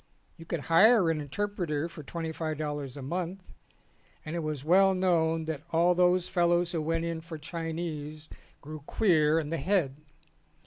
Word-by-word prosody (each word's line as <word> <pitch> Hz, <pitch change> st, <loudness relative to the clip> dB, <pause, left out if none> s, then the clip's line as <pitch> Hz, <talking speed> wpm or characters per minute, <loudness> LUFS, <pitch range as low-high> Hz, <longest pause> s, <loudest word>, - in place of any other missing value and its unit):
You 165 Hz, -, -12 dB
could 170 Hz, -3 st, -2 dB
hire 185 Hz, +3 st, +5 dB
an 155 Hz, -2 st, -2 dB
interpreter 165 Hz, -1 st, -2 dB
for 165 Hz, -2 st, -10 dB
twenty 160 Hz, +3 st, -5 dB
five 155 Hz, -1 st, -3 dB
dollars 145 Hz, -3 st, -4 dB
a 140 Hz, -, -7 dB
month 180 Hz, +5 st, -4 dB, 0.8 s
and 155 Hz, +2 st, -5 dB
it -, -, -1 dB
was 155 Hz, -3 st, -4 dB
well 190 Hz, +3 st, +5 dB
known 165 Hz, -3 st, +1 dB
that 155 Hz, -3 st, -4 dB
all 170 Hz, +2 st, +3 dB
those 180 Hz, 0 st, +3 dB
fellows 175 Hz, 0 st, +2 dB
who 165 Hz, -3 st, -1 dB
went 165 Hz, +2 st, -1 dB
in 165 Hz, -1 st, -3 dB
for 165 Hz, 0 st, -8 dB
Chinese 155 Hz, -1 st, -5 dB, 0.3 s
grew 155 Hz, +2 st, -8 dB
queer 160 Hz, -6 st, +3 dB
in 150 Hz, -1 st, -4 dB
the 165 Hz, -, 0 dB
head. 150 Hz, -4 st, 0 dB
165 Hz, 170 wpm, -29 LUFS, 155-175 Hz, 0.8 s, hire